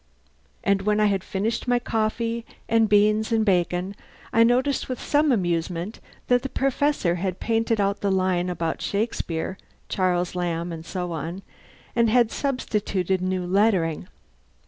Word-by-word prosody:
And 200 0 +2
when 210 +1 +1
I 215 - +4
had 195 -3 +1
finished 215 +6 -2
my 245 0 +3
coffee 230 0 -1 0.2
and 225 -1 +3
beans 210 +2 +3
and 220 -1 +2
bacon 180 0 +1 0.4
I 230 - +6
noticed 255 +5 +2
with 255 - -3
some 295 0 +2
amusement 175 -1 -1 0.3
that 245 0 +3
the 270 - -4
Professor 270 -10 +1
had 185 0 -3
painted 225 -1 0
out 200 0 +1
the 200 - +1
line 185 -1 +1
about 165 -2 -2
Shakespeare, 190 -4 -2 0.3
Charles 180 -2 0
Lamb, 175 -1 -2
and 160 -1 -6
so 180 -2 -3
on, 165 +4 -5 0.5
and 235 -1 +3
had 235 -1 +4
substituted 205 -9 -1
new 185 -1 -1
lettering. 180 -4 +1
200 Hz, 145 wpm, -24 LUFS, 180-230 Hz, 0.5 s, I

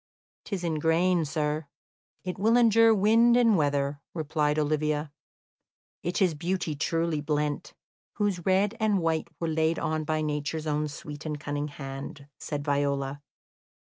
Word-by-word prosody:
"'Tis 195 -4 -4
in 160 -3 -1
grain, 170 +2 +2
sir; 150 0 -2 0.6
it 180 0 -5
will 225 +4 +4
endure 230 -1 +6
wind 225 +3 +5
and 230 -3 +5
weather," 145 -2 0
replied 150 -2 0
Olivia. 150 0 0 0.9
"It 175 +3 0
is 180 -3 +2
beauty 170 +1 -2
truly 165 +1 0
blent, 150 0 -2 0.4
whose 200 -5 -1
red 195 +4 +2
and 215 -2 +2
white 165 -2 0
were 165 - -1
laid 160 +1 +1
on 155 0 -1
by 155 0 -1
Nature's 150 +1 -2
own 150 0 0
sweet 145 +1 -8
and 150 -2 -4
cunning 145 0 -3
hand," 140 0 -8
said 145 -2 -4
Viola. 140 -1 0
155 Hz, 140 wpm, -28 LUFS, 150-180 Hz, 0.9 s, endure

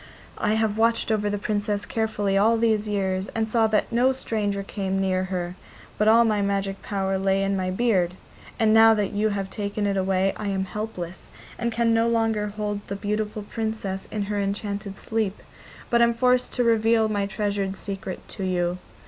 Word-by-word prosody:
I 210 - +1
have 220 -1 0
watched 230 0 +2
over 210 -1 +1
the 205 - -1
Princess 205 0 -1
carefully 215 -3 -1
all 220 +4 +4
these 220 -2 +1
years 190 -2 -1
and 225 -1 0
saw 225 0 +3
that 215 +1 0
no 245 +3 +4
stranger 210 -6 -2
came 195 -1 -2
near 185 -1 +1
her, 180 -2 -3 0.5
but 210 - +3
all 230 +2 +6
my 210 -2 +1
magic 195 -1 -1
power 195 -1 -1
lay 195 0 +2
in 195 0 0
my 185 -1 -1
beard, 185 -4 +1 0.4
and 220 -2 +3
now 225 0 +7
that 205 -1 -1
you 210 +1 +1
have 195 -2 -3
taken 205 0 -2
it 200 -1 0
away 190 0 +1
I 210 - -4
am 190 -1 -1
helpless, 190 -4 -6 0.3
and 235 0 0
can 230 0 +2
no 225 0 +3
longer 225 -2 +1
hold 205 0 -3
the 200 - -3
beautiful 210 +1 -2
Princess 220 -3 -4
in 210 -1 -2
her 205 +1 -2
enchanted 200 0 -3
sleep, 220 -3 -2 0.5
but 235 0 +4
am 235 0 +4
forced 250 +1 +2
to 245 - +1
reveal 225 -1 +3
my 205 -2 -1
treasured 200 -1 -2
secret 195 -1 -6
to 195 - -6
you. 180 -1 0
205 Hz, 190 wpm, -25 LUFS, 195-220 Hz, 0.5 s, now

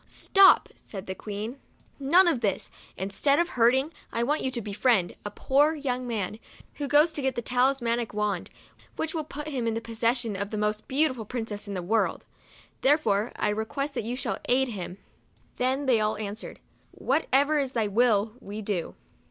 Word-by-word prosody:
" - - -33 0.2
Stop," 390 -1 +6
said 195 -2 -9
the 190 - -4
Queen, 210 +6 -6 0.2
" - - -35
none 340 +7 +5
of 275 -9 +2
this! 200 -4 -1 0.3
Instead 200 +10 +1
of 345 +2 +1
hurting, 260 +6 +2 0.2
I 230 - 0
want 295 +5 0
you - - -1
all 260 - -3
to 240 - -2
befriend, 205 -2 +1
a 205 - -4
poor 285 +9 +2
young 255 -4 -3
man, 215 -2 -3 0.4
who 290 - -3
goes 300 +4 +5
to 300 - -3
get 265 -1 0
the 240 - -2
talismanic 245 -2 +1
wand, 210 -1 -2 0.5
which 320 0 -3
will 320 -2 -2
put 295 +1 -7
him 255 -5 -2
in 225 0 0
possession 230 0 0
of 200 +1 -3
the 215 - -4
most 210 0 -1
beautiful 265 -4 +1
princess 220 -3 -4
in 200 - -4
the 180 - -3
world. 220 +5 0 0.6
Therefore 235 -7 +2
I 210 - 0
request 250 +7 -2
that - - -3
you 235 +3 -3
shall 255 - -3
aid 260 +1 +3
him." 185 -4 -6 0.6
Then 265 +3 0
they 250 -4 +4
all 215 0 0
answered, 210 +1 -6 0.2
" - - -37
What 285 +5 -1
ever 285 +3 +4
is 270 -2 -2
thy 225 -3 +1
will, 215 0 +2
we 210 -2 -7
do." 195 -5 -3
240 Hz, 195 wpm, -27 LUFS, 210-275 Hz, 0.6 s, Stop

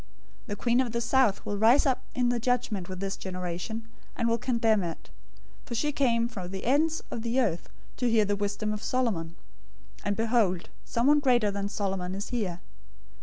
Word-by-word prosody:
012:042 - - -28
The 205 - -3
queen 235 +4 +2
of 250 -3 -2
the 235 - 0
south 250 -4 +2
will 205 -1 -2
rise 235 +8 +6
up 265 -3 +2
in 245 -1 +2
the 245 -1 +1
judgment 230 -6 -1
with 185 -1 -5
this 195 0 -2
generation, 185 +5 -5 0.3
and 235 - 0
will 230 0 +2
condemn 230 -4 +2
it, 170 -2 -6 0.5
for 235 - -6
she 295 +6 +1
came 235 -5 +2
from 195 -7 -6
the 190 0 -6
ends 310 +6 +2
of 230 - -3
the 235 +3 0
earth 185 -9 0 0.3
to 245 -1 +1
hear 225 -2 +4
the 205 0 0
wisdom 205 +1 -2
of 210 - -5
Solomon; 220 -10 -1 0.7
and 205 0 0
behold, 220 -5 +1
someone 280 +6 +3
greater 245 -7 +3
than 200 0 -3
Solomon 190 -3 -2
is 200 +2 -5
here. 195 -8 -2
225 Hz, 190 wpm, -28 LUFS, 195-245 Hz, 0.7 s, rise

